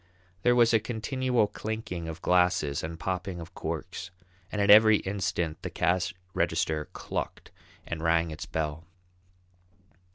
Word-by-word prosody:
There 120 +4 +4
was 120 -1 +5
a 110 - +6
continual 125 +1 0
clinking 105 -6 -5
of 80 +1 -7
glasses 90 -6 +2
and 80 +1 -6
popping 95 -1 -3
of 85 +2 -9
corks, 85 +3 -5 0.4
and 105 - -3
at 100 0 +5
every 110 0 +8
instant 90 -5 -2
the - - -4
cash 90 +1 +1 0.2
register 75 -1 0
clucked - - -5 0.3
and 80 -1 -4
rang 80 0 +2
its 80 - -7
bell. 80 +1 -3
90 Hz, 135 wpm, -28 LUFS, 80-105 Hz, 0.4 s, every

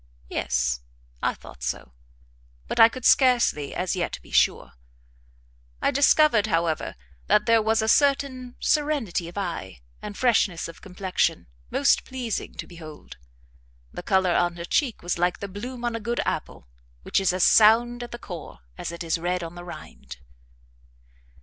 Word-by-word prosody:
Yes, 65 0 0 0.4
I - - 0
thought - - -14
so; 60 0 -4 0.7
but - - -3
I 225 - +9
could 255 0 -8
scarcely 245 - +3
as 180 +2 -1
yet 175 -2 -2
be - - -17
sure. - - +2 1.1
I - - +1
discovered, 280 -5 +4
however, 165 -4 -1 0.3
that 210 - +3
there 230 -1 +4
was 220 +1 +1
a - - -1
certain 265 -2 +1
serenity 290 - 0
of 175 - -13
eye, 165 - -5 0.2
and 205 -1 -7
freshness 215 -8 +2
of 165 - -12
complexion, 185 0 -1 0.2
most 280 - +3
pleasing 250 -5 -4
to - - -6
behold. 160 -3 -12 0.8
The - - -6
colour 190 -2 +2
on 175 -1 +1
her 170 0 -6
cheek 250 - 0
was 175 0 -2
like 175 0 +1
the 200 - -6
bloom 240 +5 -7
on 235 -1 -1
a - - -3
good 235 +2 -3
apple, - - -4 0.4
which - - +1
is 190 -2 +2
as 185 0 0
sound 235 +3 +5
at 240 - -6
the 240 - -7
core 175 - -9 0.2
as - - -4
it 170 +1 -6
is 165 0 -1
red 180 +1 -1
on 165 0 -7
the 175 0 -9
rind. 65 - -10
195 Hz, 160 wpm, -25 LUFS, 170-240 Hz, 1.1 s, I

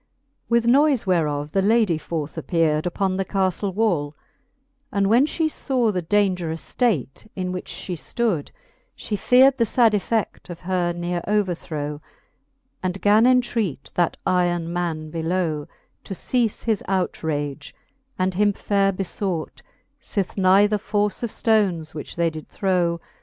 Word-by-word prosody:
With 235 0 +3
noife 275 0 +4
whereof 150 -5 0
the 195 - +2
lady 210 -5 +3
forth 155 -2 -4
appeared 160 -1 +1
Upon 190 +1 -1
the 195 - +1
caflle 190 0 -1
wall, 175 -8 0 0.8
and 200 -1 +1
when 235 +8 +4
fhe 320 0 0
faw 250 -7 0
The 185 -3 -1
daungerous 180 -3 -1
ftate, 205 - 0
in 185 -1 -3
which 180 0 -6
fhe 185 - -5
ftood, 185 -1 -2 0.5
fhe 210 -2 -4
feared 265 +2 +5
The 230 - +4
fad 235 0 +4
efFe£i: 210 0 -1
of 170 -1 -8
her 180 -1 0
neare 175 0 -3
overthrow 170 -8 -2
5 - - -31 0.7
And 185 +1 -3
gan 215 +3 +5
entreat 235 - 0
that 175 -1 +1
iron 175 -2 +1
man 160 -3 -3
below, 165 -2 -1 0.4
To 195 - -5
eafe 235 +2 -1
his 220 -4 0
outrage, 155 -6 -2 0.4
and 185 0 0
him 205 +2 +2
faire 195 0 +1
befbught, 185 -3 -3 0.4
Sith 200 -4 -3
neither 200 +2 +4
force 205 -1 -1
of 235 - -2
ftoneSj 200 -9 +1
which 150 - -7
they 170 -1 +1
did 155 -1 -9
throw. 175 -3 0
185 Hz, 145 wpm, -23 LUFS, 165-210 Hz, 0.8 s, feared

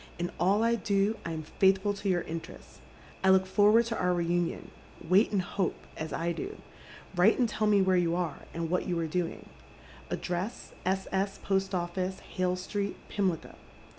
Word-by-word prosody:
In 175 0 -2
all 200 +5 +3
I 230 0 +3
do 205 -1 +1
I 170 - -4
am 160 -1 -4 0.2
faithfiil 195 +1 +4
to 200 - -1
your 175 -2 +2
interests. 165 0 -8 0.4
I 190 - +5
look 190 0 +5
forward 210 +4 +5
to 230 0 -3
our 180 0 +2
reunion. 175 0 -1 0.4
Wait 190 +6 +5
and 195 -3 +1
hope, 185 0 -1 0.2
as 155 0 -5
I 170 +1 -1
do. 400 - -5 0.6
Write 180 +5 +5
and 245 - +3
tell 215 -1 0
me 205 -2 +5
where 190 -1 +3
you 170 -1 +2
are, 175 -5 -2
and 165 0 -3
wliat 180 +2 0
you 175 -2 0
are 165 - 0
doing. 170 +1 -3 0.3
— - - -20
Address, 180 +6 -3 0.2
S. 190 0 0
S., 195 +1 0
Post 195 0 0
Office, 180 +2 -2
Hale 185 -1 -1
Street, 200 +2 -3
Pimlico." 185 -5 -1
190 Hz, 185 wpm, -30 LUFS, 175-200 Hz, 0.6 s, I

